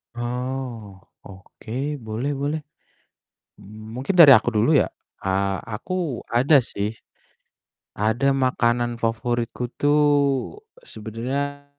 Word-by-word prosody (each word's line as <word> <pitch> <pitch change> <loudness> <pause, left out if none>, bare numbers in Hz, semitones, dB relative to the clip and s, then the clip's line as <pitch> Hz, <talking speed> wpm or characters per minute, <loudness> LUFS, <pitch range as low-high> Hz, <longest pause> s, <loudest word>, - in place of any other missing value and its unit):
Oh 120 -4 -5 0.2
oke, 95 +3 -13 0.3
boleh 115 +3 -4
boleh, 145 +3 -2 1.0
mungkin 110 - -6
dari 170 -5 +9
aku 120 -2 +5
dulu 110 +6 +3
ya, - - +3 0.3
eee, 95 0 -1
aku 135 +6 -4
ada 130 +4 +4
sih, 105 -1 -4 1.0
ada 110 +6 +1
makanan 120 -3 0
favoritku 120 +1 -2 0.2
tuh 145 +1 +4 0.9
sebenernya 135 +7 -5
120 Hz, 90 wpm, -23 LUFS, 110-135 Hz, 1.0 s, dari